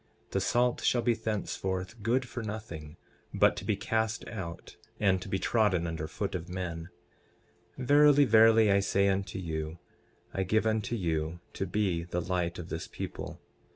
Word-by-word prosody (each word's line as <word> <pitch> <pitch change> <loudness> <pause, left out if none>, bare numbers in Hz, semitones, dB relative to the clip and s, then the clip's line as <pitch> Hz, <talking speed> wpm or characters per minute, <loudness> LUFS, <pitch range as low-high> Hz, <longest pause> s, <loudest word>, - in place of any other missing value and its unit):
The 95 - 0
salt 120 +5 +2
shall 120 -1 +2
be 120 - +3
thenceforth 105 -2 -3
good 125 +4 +1
for 120 - -5
nothing, 95 -8 -7 0.4
but - - +4
to - - -5
be - - +1
cast 110 0 -1
out 90 -6 -7 0.2
and 95 -3 +3
to 95 - -7
be 95 - 0
trodden 100 -5 +2
under 80 -2 -3
foot 100 +4 -3
of 90 -1 -4
men. 85 -2 -4 0.9
12:14 130 - -4
Verily, 145 +1 +6
verily, 110 -1 +6
I 100 - +5
say 100 0 +2
unto 95 0 -1
you, 80 -2 -4 0.6
I 95 - -1
give 110 +4 +1
unto 110 +1 0
you 80 -4 -1
to 95 - -3
be 90 -3 0
the 90 0 -2
light 90 0 -1
of 85 -1 -7
this 80 - -4
people. - - -6
95 Hz, 170 wpm, -30 LUFS, 85-110 Hz, 0.9 s, Verily